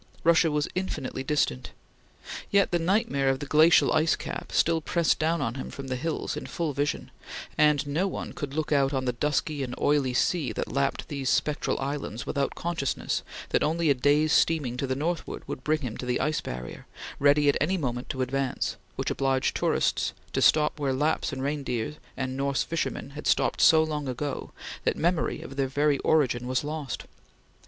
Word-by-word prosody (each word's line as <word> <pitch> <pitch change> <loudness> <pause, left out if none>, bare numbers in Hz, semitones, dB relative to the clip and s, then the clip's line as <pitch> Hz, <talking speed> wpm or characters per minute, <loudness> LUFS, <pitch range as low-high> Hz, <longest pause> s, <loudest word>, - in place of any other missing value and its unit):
Russia 165 0 +5
was 150 -1 0
infinitely 180 -8 -3
distant. 130 - 0 0.8
Yet 200 -1 +3
the 175 - +2
nightmare 170 - +1
of 135 0 +1
the - - -5
glacial 155 +3 +5
ice 155 +1 +3
cap - - -6
still 165 0 +2
pressed 170 +1 +1
down 165 +2 +1
on 115 - -1
him 130 - -6
from 135 -1 -7
the 130 - -1
hills, 155 +5 -3
in - - -6
full 165 -4 -2
vision, 145 +2 -2 0.4
and 150 -2 +3
no 155 +7 0
one - - -5
could 145 -1 -5
look 155 -1 -2
out 140 -1 +3
on 130 -1 -1
the 125 - 0
dusky 150 +3 -1
and 125 -2 -3
oily 140 -4 +2
sea 145 -5 +1
that - - -4
lapped 140 +2 -1
these 140 -3 -2
spectral 150 -1 +1
islands 135 -4 -4
without 140 -2 -1
consciousness 170 -5 -2 0.3
that - - +2
only 160 0 +2
a - - +6
day's 145 +4 +3
steaming 145 -7 +2
to 135 +2 -2
the 130 - -1
northward 165 +4 -3
would 130 - -6
bring 155 +1 +1
him 120 -5 -4
to 125 - -6
the 125 - +1
ice 155 +3 0
barrier, 60 0 -7 0.3
ready 145 +1 +4
at 140 - +4
any 185 +6 +2
moment 125 -5 -3
to 130 -3 -1
advance, 135 0 -2 0.2
which - - -2
obliged 135 -1 +1
tourists - - +1 0.2
to - - 0
stop 150 0 +4
where 140 -2 0
Laps 150 +5 0
and 135 -1 -4
reindeer 140 -2 -2 0.2
and 130 -1 -2
Norse 140 0 0
fishermen 165 -4 -3
had 150 +1 -6
stopped - - +2
so 160 -1 +7
long 150 -2 -3
ago 135 +3 -4 0.3
that - - +1
memory 170 -1 0
of 135 - -9
their 135 -1 +1
very 145 +1 +1
origin 125 -6 +2
was 130 +1 0
lost. 150 -2 -4
145 Hz, 190 wpm, -27 LUFS, 130-155 Hz, 0.8 s, so